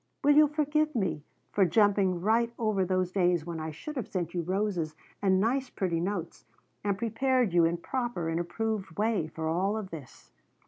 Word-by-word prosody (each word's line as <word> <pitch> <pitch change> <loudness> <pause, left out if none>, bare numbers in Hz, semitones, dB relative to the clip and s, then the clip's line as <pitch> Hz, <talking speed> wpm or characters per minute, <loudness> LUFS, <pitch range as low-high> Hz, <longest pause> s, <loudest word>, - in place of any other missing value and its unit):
Will 290 +1 +5
you 305 0 +7
forgive 305 0 0
me 175 -9 0 0.3
for 200 - +3
jumping 190 -1 +3
right 230 +4 +2
over 215 -4 +1
those 185 0 0
days 175 -4 +2
when 170 -2 -5
I 160 0 -4
should 235 - -7
have 250 - -3
sent 175 -3 -3
you 175 - -1
roses 180 -3 -1 0.3
and 190 -2 +3
nice 250 +5 +1
pretty 175 -7 -1
notes, 175 -1 -3 0.4
and 200 -1 0
prepared 235 0 +1
you 170 -1 +5
in 170 +1 +1
proper 240 -3 -3
and 165 +1 -1
approved 195 0 -3
way 210 -6 +1
for 160 0 -5
all 190 +6 0
of 205 -4 -6
this? 150 -6 -11
195 Hz, 185 wpm, -29 LUFS, 170-225 Hz, 0.4 s, you